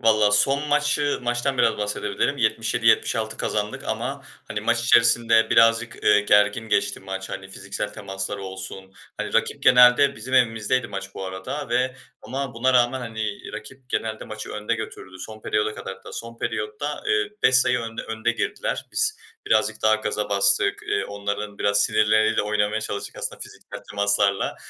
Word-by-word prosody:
Valla 110 -2 +4
son 140 +7 +2
maçı 145 0 +1
maçtan 120 +2 -1
biraz - - +3
bahsedebilirim. 105 +5 -1
77-76 115 -1 +1
kazandık 105 0 -3
ama, - - -3 0.3
hani, - - -3
maç 115 - +1
içerisinde 115 -1 +4
birazcık, 115 +1 +3
eee, 105 0 +6
gergin 105 +2 +3
geçti 100 -1 0
maç, 95 0 -6
hani, 95 0 -6
fiziksel 100 +1 -5
temasları 95 0 -5
olsun. 95 0 -8 0.2
Hani, - - -4
rakip - - 0
genelde, 125 +2 +6
bizim 130 +4 -5
evimizdeydi 120 0 +2
maç 100 0 -7
bu 95 - -5
arada 95 +10 -5
ve 125 +2 0 0.3
ama 130 +2 -4
buna 130 +3 +2
rağmen, 125 +1 +3
hani, 110 -3 -5
rakip 130 +3 -10
genelde 110 -1 -2
maçı 110 -1 -7
önde 105 +2 -2
götürdü. 95 -4 -8
Son 110 +4 -9
periyoda 105 0 0
kadar - - -6
hatta. - - -13
Son 115 0 -7
periyotta, 430 0 -3
eee, 415 -1 +1
5 130 - +5
sayı 125 0 +3
önde 115 -1 -5
önde 115 +1 -1
girdiler. - - -3
Biz 435 +1 0 0.3
birazcık 110 0 +1
daha 110 0 +5
gaza 105 -1 -2
bastık. 100 0 +2
Eee, - - 0
onların 100 0 -5
biraz 100 0 +2
sinirleriyle 110 0 +3
oynamaya 105 +1 0
çalıştık 100 -1 -5
aslında - - -5
fiziksel - - -10
temaslarla. 100 -1 +1
110 Hz, 160 wpm, -23 LUFS, 105-125 Hz, 0.3 s, eee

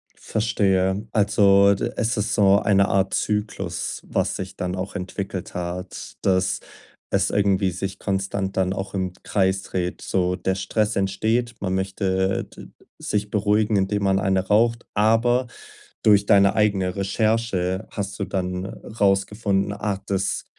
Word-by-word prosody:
Verstehe, 100 -2 0
also 100 -1 +5
d - - -3
es 115 -1 0
ist 105 - -1
so 100 -1 +5
eine 100 -2 +3
Art 95 0 +1
Zyklus, 105 -5 -2
was - - -1
sich - - -6
dann 90 0 -3
auch 95 +2 -5
entwickelt 95 -1 -5
hat, 90 +1 -5
dass 95 0 +2 0.5
es - - +2
irgendwie 100 -2 +2
sich 95 +2 -4
konstant 95 0 -2
dann 95 0 +1
auch 95 0 -5
im 95 -2 -2
Kreis 95 -1 +1
dreht. 90 -1 -3
So, 90 -1 0
der 95 +1 -1
Stress 105 +3 -1
entsteht, 110 +5 0
man 95 -2 -1
möchte 95 0 0
d - - -13 0.3
sich 105 0 -1
beruhigen, 105 +1 +2
indem 100 +1 0
man 95 -1 +2
eine 95 0 +1
raucht, 115 +3 +2
aber 115 +4 +3 0.6
durch 100 -2 +5
deine 100 0 +5
eigene 100 -4 +1
Recherche 100 -2 0
hast 100 -1 -5
du 100 - -1
dann 90 0 -3
rausgefunden, 100 0 0
ah, 100 -1 -3
das, 95 -1 -1
100 Hz, 145 wpm, -23 LUFS, 95-105 Hz, 0.6 s, also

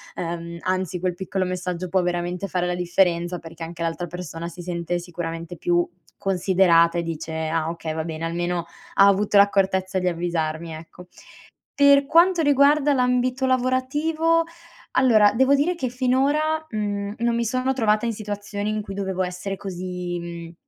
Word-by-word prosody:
ehm, 170 0 -5
anzi 185 -1 -1
quel 180 0 -1
piccolo 190 +1 -2
messaggio 180 0 -3
può 190 +1 +2
veramente 175 +2 -2
fare 180 -1 -1
la 180 - -1
differenza, 175 0 +1
perché 165 0 -12
anche 170 0 -6
l'altra 165 +1 -2
persona 170 -1 -6
si 175 +1 -9
sente 175 0 -2
sicuramente 170 -1 -6
più 175 +1 +1 0.3
considerata 180 -3 +3
e 170 - 0
dice: 160 -1 -5 0.2
"Ah 160 -1 0
okay 165 -1 -4
va 160 0 -2
bene, 160 0 -5
almeno 175 +1 -2 0.3
ha 195 - +7
avuto 200 +1 +3
l'accortezza 190 -1 +3
di 180 - -1
avvisarmi." 165 -2 -2
Ecco. 165 +3 -11 0.7
Per 280 0 +5
quanto 340 +2 +4
riguarda 285 +1 +4
l'ambito 250 0 +1
lavorativo, 295 +6 +1 0.5
allora 220 -6 +5
devo 265 +4 +4
dire 300 +6 +1
che 300 -8 -3
finora, 280 +5 +1
mhmm, 205 -1 -3
non 235 0 +1
mi 235 - 0
sono 255 +3 0
trovata 220 -3 +1
in 230 - -1
situazioni 205 0 -4
in 215 0 -1
cui 195 - -7
dovevo 190 -1 -2
essere 180 +2 -4
così 180 -2 -5
mhmm, 170 -1 -8
185 Hz, 160 wpm, -23 LUFS, 175-245 Hz, 0.7 s, ha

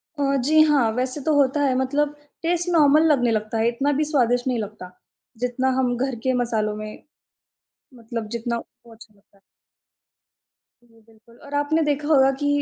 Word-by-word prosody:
अ, 275 -1 0
जी 310 +4 +4
हाँ, 270 -7 +3
वैसे 255 +3 -2
तो 315 - +2
होता 285 +1 +2
है 265 -2 +2
मतलब 285 +3 -1 0.3
टेस्ट 345 +1 -1
नॉर्मल 305 -1 +5
लगने 245 -4 +2
लगता 215 0 -2
है। 225 +1 +1
इतना 275 +5 -1
भी - - +2
स्वादिष्ट 245 -2 +1
नहीं 245 -2 0
लगता 205 -4 -7 0.6
जितना 255 +2 -1
हम 250 -2 +1
घर 265 0 -2
के 260 - +2
मसालों 215 -3 -2
में 215 0 -8 0.9
मतलब 230 -2 -6
जितना 235 +1 -3
वो 235 0 -15
अच्छा 220 -1 -17
लगता 200 0 -31
है। - - -33 1.4
जी, 230 -1 -25
बिल्कुल 225 +1 -23
और 285 - -11
आपने 290 +3 +1
देखा 290 0 -1
होगा 270 -3 +4
कि 290 - -1
255 Hz, 175 wpm, -22 LUFS, 230-290 Hz, 1.4 s, नॉर्मल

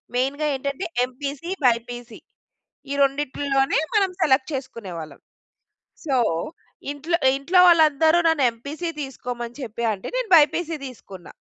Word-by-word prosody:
మెయిన్‌గా 275 +4 0
ఏంటంటే 280 +6 -3 0.2
MPC, 280 +6 -6
BiPC 240 0 -1 0.7
ఈ - - 0
రెండిటిలోనే 275 0 0 0.2
మనం 390 -2 +3
సెలెక్ట్ 265 0 +2
చేసుకునేవాళ్ళం. 185 - -7 0.8
సో, 270 -3 +1 0.8
ఇంట్లో 320 +4 -1 0.2
ఇంట్లో 350 +7 +4
వాళ్ళందరూ, 320 0 +5
నన్ను 305 -5 +2
ఎంపీసీ 300 +8 -5
తీసుకోమని 245 -2 -6
చెప్పి 235 0 -4
అంటే, 190 - -8
నేను - - -2
బైపీసీ 320 +2 +2
తీసుకున్నా. 195 -8 -12
275 Hz, 110 wpm, -23 LUFS, 245-310 Hz, 0.8 s, వాళ్ళందరూ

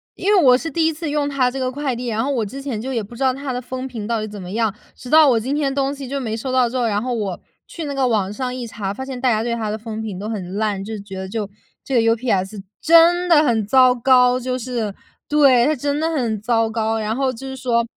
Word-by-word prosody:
因 405 +3 +1
为 390 - +5
我 250 -4 +6
是 325 +2 -5
第 325 +3 +1
1 - - +2
次 320 +1 -5
用 290 -1 0
它 260 -3 +1
这 270 - -5
个 255 -1 -1
快 275 -2 -2
递， 245 +1 -5
然 225 0 -1
后 280 - -1
我 240 -5 0
之 265 +7 -7
前 260 -6 -4
就 260 +3 -4
也 230 -4 -1
不 225 +4 -11
知 255 - -10
道， 260 -1 +3
它 270 -1 -5
的 250 - -3
风 255 +1 -5
评 225 -5 -6
到 230 -1 0
底 215 - -4
怎 205 -1 -8
么 180 - -8
样。 220 -1 0 0.2
直 250 - -11
到 310 0 +7
我 235 -3 +3
今 260 +6 -2
天 285 -2 0
东 275 0 0
西 275 -2 -7
就 275 +2 -3
没 225 -4 -3
收 245 +4 -4
到 255 -1 +3
之 250 - -8
后， 245 -2 +1
然 205 -1 0
后 250 +1 -2
我 205 -6 -3 0.3
去 335 - -7
那 285 - -4
个 270 -2 +1
网 205 -5 0
上 250 +2 -3
一 250 -1 -5
查， 210 -4 -4
发 265 +6 -6
现 265 -2 -6
大 255 - +3
家 220 -2 +1
对 235 0 -1
它 220 -2 -3
的 215 - -2
风 220 0 -6
评 210 -4 -5
都 205 +3 -5
很 195 -4 -5
烂， 205 -2 -1
就 220 +2 -5
觉 195 -1 -9
得 190 0 -6
就 210 0 -3 0.4
这 275 - -5
个 235 - +5
UPS 210 -4 -1 0.2
真 335 +2 +5
的 310 -3 +6
很 225 -7 +1
糟 255 +2 +6
糕。 250 0 +4
就 255 0 -2
是， 235 -4 -3 0.3
对， 275 -5 +5
它 310 - +2
真 285 +2 -2
的 320 +1 0
很 235 -10 -1
糟 225 0 +1
糕。 220 0 -1
然 215 +1 -2
后 265 0 0
就 255 +2 -9
是 265 - -6
说 235 -3 0
250 Hz, 315 characters per minute, -20 LUFS, 220-270 Hz, 0.4 s, 到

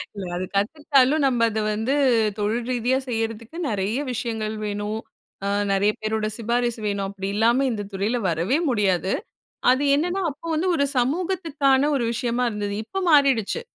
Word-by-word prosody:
இல்ல 195 - -5
அது 185 +1 -2
கத்துக்கிட்டாலும் 280 +5 +2
நம்ம 245 -4 +3
அத 220 0 -2
வந்து 225 +6 -1 0.5
தொழில் 225 +3 -1
ரீதியா 250 +2 +1
செய்றதுக்கு 225 +3 -3
நிறைய 205 +4 -1
விஷயங்கள் 220 -2 -3
வேணும். 205 +1 -3 0.5
அ - - 0 0.3
நிறைய 200 +2 +3
பேரோட 215 0 -1
சிபாரிசு 235 0 -1
வேணும். 200 -1 -1
அப்டி 195 -1 -5
இல்லாம 235 +5 +3
இந்த 210 -3 -3
துறையில 205 +6 0
வரவே 170 - +1
முடியாது. 195 -5 +1 0.6
அது 260 +3 +2
என்னன்னா 355 +6 0
அப்போ 290 +3 -11
வந்து 340 +4 0
ஒரு 280 - +2
சமூகத்துக்கான 290 -1 +1
ஒரு 260 - 0
விஷயமா 240 +1 -1
இருந்தது. 205 -2 -3
இப்போ 385 - -4
மாறிடுச்சு. 275 - +3
230 Hz, 150 wpm, -23 LUFS, 210-270 Hz, 0.6 s, நம்ம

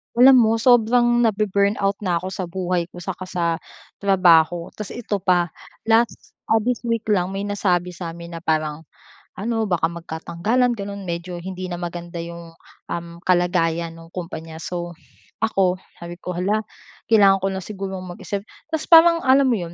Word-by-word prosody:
Alam 255 +1 +8
mo 225 -1 +4
sobrang 240 0 +4
nabe-burnout 200 -1 +1
na 180 -4 0
ako 185 - -5
sa 190 -1 -4
buhay 180 -1 -2
ko 175 0 -11
saka 185 0 -5
sa 180 -2 -2 0.6
trabaho. 175 -4 +4
Tapos 210 -3 -7
ito 215 -4 -3
pa, 175 -2 +2 0.3
last 225 +1 +1 0.2
ah, 225 0 +3
this 245 +1 0
week 230 -1 0
lang 180 -3 +2
may 195 +1 -3
nasabi 185 -3 0
sa'min 170 -1 -8
na - - -6
parang 155 -1 -1 0.5
ano 225 +2 -1
baka 175 -5 +1
magkatanggalan, 170 +9 -1
ganun. 200 -1 -6
Medyo 170 +1 -4
hindi 185 +1 -6
na 175 - -4
maganda 175 0 -6
yung, 170 0 -9 0.4
um, 170 0 -3 0.2
kalagayan 170 -2 +1
nung 165 0 -14
kumpanya. 165 -2 -7
So, 175 +1 -4 0.5
ako 195 -5 +2 0.2
sabi 170 0 -9
ko, 180 -1 -5
"Hala, 205 +4 +1 0.5
kailangan 200 -3 +5
ko 195 - 0
na 190 - -3
sigurong 195 -2 -5
mag-isip." 195 +3 -5 0.2
Tas 315 -1 -2
parang 335 0 +7
alam 265 +1 +5
mo 235 - +2
yun, 170 -3 -6
185 Hz, 160 wpm, -22 LUFS, 170-215 Hz, 0.6 s, Alam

